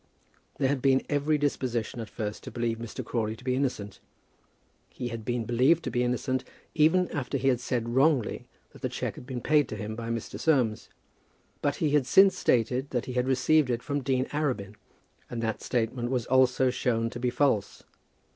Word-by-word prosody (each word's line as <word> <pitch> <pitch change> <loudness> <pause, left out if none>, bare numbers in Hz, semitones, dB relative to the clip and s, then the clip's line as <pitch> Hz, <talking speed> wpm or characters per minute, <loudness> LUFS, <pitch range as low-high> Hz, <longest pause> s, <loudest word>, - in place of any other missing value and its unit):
There 135 - +2
had 135 -1 0
been 135 0 +3
every 145 +1 +1
disposition 125 -5 -2
at 110 -3 -6
first 105 -1 -5
to - - -5
believe 115 -1 -2
Mr. 115 -1 -6
Crawley 110 -2 -2
to 115 - -16
be 125 0 0
innocent. 125 -7 -2 0.9
He 120 - -5
had 115 -1 -6
been 120 0 -2
believed 130 +9 +3
to - - -3
be 120 - 0
innocent, 125 +1 -1 0.3
even 165 +4 +4
after 140 -1 -2
he 135 +1 +2
had 125 -2 +2
said 120 -2 -2
wrongly 135 0 +2 0.3
that - - -15
the - - -1
cheque - - -3
had 125 - -12
been 125 -2 -4
paid 150 -2 +3
to - - -4
him 110 +1 -5
by 115 0 -5
Mr. 115 -1 -4
Soames; 125 -9 +1 0.7
but 145 0 +1
he 150 -1 0
had 145 -3 +2
since 195 +7 +6
stated 125 +3 +1
that 125 -2 -2
he 125 - -5
had 125 0 0
received 140 +2 +3
it 120 0 -1
from 145 0 -2
Dean 130 -1 0
Arabin, 130 -10 -1 0.6
and 120 - -4
that 110 -1 -2
statement 120 0 -1
was 125 -3 -1
also 130 0 +3
shown 115 -2 0
to 120 - -6
be 125 0 0
false. 120 -5 0
125 Hz, 195 wpm, -28 LUFS, 115-140 Hz, 0.9 s, since